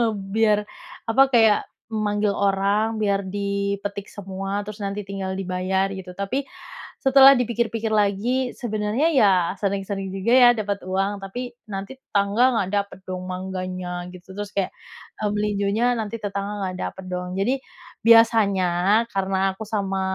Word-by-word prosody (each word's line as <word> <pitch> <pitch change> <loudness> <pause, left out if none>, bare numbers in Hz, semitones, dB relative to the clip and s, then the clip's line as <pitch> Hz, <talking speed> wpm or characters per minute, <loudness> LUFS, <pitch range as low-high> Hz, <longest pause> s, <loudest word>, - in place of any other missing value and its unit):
Biar, 210 +1 +1 0.4
apa, 225 +4 +3
kayak 225 -5 +5 0.3
memanggil 210 -1 0
orang 200 +3 +1
biar 200 -2 0
dipetik 200 0 -3
semua, 195 +1 -4
terus 210 +1 -9
nanti 200 +1 -3
tinggal 190 -1 -4
dibayar" 190 +1 -1
gitu. 185 -2 -8
Tapi, 260 +8 -2 0.5
setelah 270 0 +7
dipikir 235 -1 0
pikir 225 -1 -2
lagi, 215 +5 +1
sebenarnya 215 +5 0
ya 215 -7 +5 0.3
sering 195 -1 -1
sering 195 -1 -4
juga 195 +5 0
ya 250 -1 +8
dapat 200 -1 -2
uang, 195 +2 -1
tapi, 245 +6 -6 0.2
nanti 195 +5 -5
tetangga 200 +3 +1
nggak 190 -3 0
dapat 200 -1 -1
dong 185 0 -5
mangganya, 185 -1 -5
gitu. 180 +1 -12
Terus 205 0 -5
kayak, 195 -2 -2 0.5
eee, 210 - +1
melinjonya 210 +3 +1
nanti 225 -1 -3
tetangga 200 -1 -4
nggak 185 0 -4
dapet 190 - -6
dong. 180 0 -4
Jadi, 255 +7 0 0.4
biasanya 210 -3 +4
karena 195 0 0
aku 220 +3 -8
sama 195 -3 -1
200 Hz, 145 wpm, -23 LUFS, 195-220 Hz, 0.5 s, ya